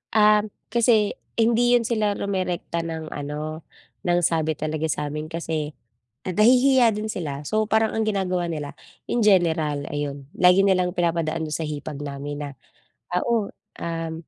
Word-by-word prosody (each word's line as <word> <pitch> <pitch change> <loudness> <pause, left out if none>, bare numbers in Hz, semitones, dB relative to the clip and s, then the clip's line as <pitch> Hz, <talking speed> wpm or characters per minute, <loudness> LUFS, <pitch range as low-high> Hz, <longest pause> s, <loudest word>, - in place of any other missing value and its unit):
Um, 210 0 +5 0.2
kasi 225 -2 +3 0.2
hindi 235 +1 +4
'yun 240 - +3
sila 215 -3 0
rumerekta 185 -4 -2
ng 160 -1 -5
ano 150 +2 -5 0.4
ng 175 0 +3
sabi 160 -2 +1
talaga 155 +1 -2
sa'min 150 +1 -3
kasi, 160 -2 -3 0.5
nahihiya 245 +5 +5
din 210 +1 -3
sila, 150 -8 -4
so 215 0 +1
parang 220 0 +1
ang 220 - +1
ginagawa 185 -5 -1
nila 150 -3 -5 0.3
in 240 -2 +1
general 160 -7 +2
ayun. 145 -2 -4
Lagi 185 +2 +5
nilang 180 -2 +2
pinapadaan 165 -3 -1
do'n 150 - -3
sa 165 - -2
hipag 150 -1 -5
namin 145 +1 -5
na, 145 - -5 0.6
ah, 180 - +2
o, 230 -4 +1 0.3
um, 165 -1 -3
170 Hz, 145 wpm, -24 LUFS, 155-210 Hz, 0.6 s, Um